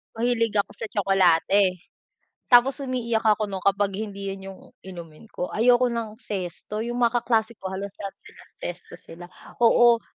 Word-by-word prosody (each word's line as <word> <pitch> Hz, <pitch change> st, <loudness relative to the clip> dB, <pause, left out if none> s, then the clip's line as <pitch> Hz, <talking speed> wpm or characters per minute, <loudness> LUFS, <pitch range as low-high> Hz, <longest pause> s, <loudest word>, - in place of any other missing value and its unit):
Mahilig 230 Hz, -1 st, 0 dB
ako 200 Hz, -, -1 dB
sa 220 Hz, -, -6 dB
tsokolate, 195 Hz, -1 st, +3 dB, 0.9 s
tapos 260 Hz, +3 st, +5 dB
umiiyak 235 Hz, -4 st, -1 dB
ako 215 Hz, -1 st, +2 dB
no'n 190 Hz, -2 st, -6 dB
kapag 200 Hz, 0 st, +1 dB
hindi 200 Hz, -1 st, -5 dB
'yun 195 Hz, 0 st, -5 dB
'yung 190 Hz, -, -13 dB, 0.2 s
inumin 170 Hz, +1 st, -11 dB
ko, 180 Hz, -, -4 dB
ayoko 245 Hz, +3 st, +4 dB
ng 230 Hz, -3 st, -4 dB
Zesto, 200 Hz, 0 st, -5 dB
'yung 240 Hz, +1 st, -4 dB
mga 240 Hz, 0 st, +2 dB
kaklase 225 Hz, -1 st, 0 dB
ko 190 Hz, -3 st, -7 dB
halos 195 Hz, +1 st, -6 dB
lahat 195 Hz, -1 st, -7 dB
sila -, -, -16 dB, 0.2 s
Zesto 175 Hz, 0 st, -7 dB
sila, 175 Hz, +1 st, -12 dB, 0.4 s
oo, 235 Hz, 0 st, +5 dB
210 Hz, 160 wpm, -24 LUFS, 195-235 Hz, 0.9 s, tapos